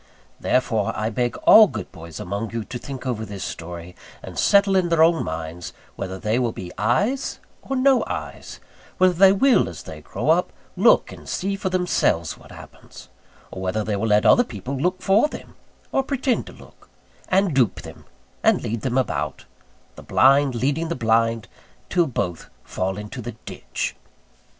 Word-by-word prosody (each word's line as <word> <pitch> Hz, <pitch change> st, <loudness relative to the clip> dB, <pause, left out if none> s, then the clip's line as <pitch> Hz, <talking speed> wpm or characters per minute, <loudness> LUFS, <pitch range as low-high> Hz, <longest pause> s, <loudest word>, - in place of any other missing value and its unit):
Therefore 115 Hz, -5 st, 0 dB
I 110 Hz, +3 st, -1 dB
beg 120 Hz, +1 st, -1 dB
all 215 Hz, -1 st, +9 dB
good 110 Hz, -, -7 dB
boys 80 Hz, -2 st, -10 dB
among 100 Hz, +5 st, -4 dB
you 115 Hz, 0 st, -4 dB
to 120 Hz, +3 st, -7 dB
think 135 Hz, 0 st, -8 dB
over 120 Hz, -4 st, -2 dB
this 100 Hz, -3 st, -7 dB
story, 85 Hz, +1 st, -7 dB, 0.3 s
and -, -, -9 dB
settle 200 Hz, -1 st, +4 dB
in 180 Hz, -2 st, +2 dB
their 165 Hz, -1 st, +4 dB
own 165 Hz, 0 st, +3 dB
minds 80 Hz, +2 st, -6 dB, 0.2 s
whether 95 Hz, -1 st, -5 dB
they 110 Hz, +5 st, 0 dB
will 120 Hz, -2 st, 0 dB
be 90 Hz, -5 st, -8 dB
eyes 205 Hz, -, 0 dB, 0.2 s
or 270 Hz, -, -4 dB
no 260 Hz, 0 st, +4 dB
eyes; -, -, -6 dB, 0.4 s
whether 185 Hz, -1 st, +4 dB
they 190 Hz, +2 st, +6 dB
will, 255 Hz, +7 st, +3 dB
as -, -, -9 dB
they -, -, -9 dB
grow -, -, -1 dB
up, -, -, +2 dB, 0.2 s
look -, -, +4 dB
and -, -, -11 dB
see 195 Hz, +2 st, -2 dB
for 195 Hz, -1 st, -3 dB
themselves 180 Hz, -, 0 dB
what -, -, -17 dB
happens: -, -, -13 dB, 0.4 s
or 95 Hz, -, -7 dB
whether 95 Hz, +3 st, -1 dB
they 105 Hz, -1 st, -2 dB
will 105 Hz, +3 st, -1 dB
let 105 Hz, -1 st, +3 dB
other 245 Hz, -, +6 dB
people 125 Hz, -, -6 dB
look 180 Hz, +7 st, -1 dB
for 200 Hz, +8 st, +4 dB
them, -, -, -10 dB, 0.4 s
or -, -, +2 dB
pretend 265 Hz, -2 st, -1 dB
to -, -, -10 dB
look; -, -, -18 dB, 0.4 s
and 190 Hz, -2 st, +2 dB
dupe 130 Hz, -5 st, +1 dB
them, -, -, -12 dB, 0.4 s
and -, -, +3 dB
lead 110 Hz, 0 st, -3 dB
them 125 Hz, +2 st, -1 dB
about 75 Hz, -, -2 dB, 0.5 s
the -, -, -9 dB
blind 135 Hz, 0 st, +4 dB
leading 145 Hz, +7 st, -1 dB
the 170 Hz, -, -2 dB
blind, 115 Hz, -1 st, +1 dB, 0.4 s
till 175 Hz, -3 st, +3 dB
both 90 Hz, -, -4 dB
fall 95 Hz, +1 st, -3 dB
into 105 Hz, +5 st, -7 dB
the 120 Hz, +1 st, -6 dB
ditch. -, -, -5 dB
125 Hz, 180 wpm, -22 LUFS, -, 0.5 s, all